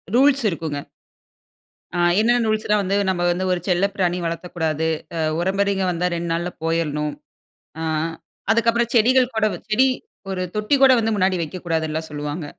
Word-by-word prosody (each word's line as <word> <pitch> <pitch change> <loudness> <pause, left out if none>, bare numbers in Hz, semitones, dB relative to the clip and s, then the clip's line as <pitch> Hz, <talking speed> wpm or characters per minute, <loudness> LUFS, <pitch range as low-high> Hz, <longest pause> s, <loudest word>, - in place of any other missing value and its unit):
Rules 275 +1 +4
இருக்குங்க. 160 -4 -4 1.2
ஆ - - 0 0.2
என்னென்ன 235 +1 +3
ரூல்ஸ்ன்னா 215 -1 +1
வந்து, 195 0 0
நம்ப 180 -2 -1
வந்து 180 +2 -1
ஒரு 180 - +1
செல்ல 180 +1 +2
பிராணி 180 -2 +1
வளர்த்தக்கூடாது. 165 -2 -2 0.3
அ - - -1 0.2
உறவுமுறைங்க 195 +1 +1
வந்தா, 175 +1 0
2 170 0 -3
நாள்ள 170 +1 -1
போயிறனும். 150 -2 -1 0.7
ஆ - - -2 0.7
அதுக்கப்பறம் 230 +1 +2
செடிகள் 250 +2 +4
கூட 220 -1 +2
வச் 175 - -10
செடி 245 +5 +4 0.4
ஒரு 190 -1 -2
தொட்டி 210 +6 +2
கூட 270 -1 +8
வந்து 225 0 0
முன்னாடி 190 -1 +2
வைக்கக்கூடாதுன்ல்லாம் 160 -1 -3
சொல்லுவாங்க. 150 +2 -4
185 Hz, 150 wpm, -22 LUFS, 165-220 Hz, 1.2 s, கூட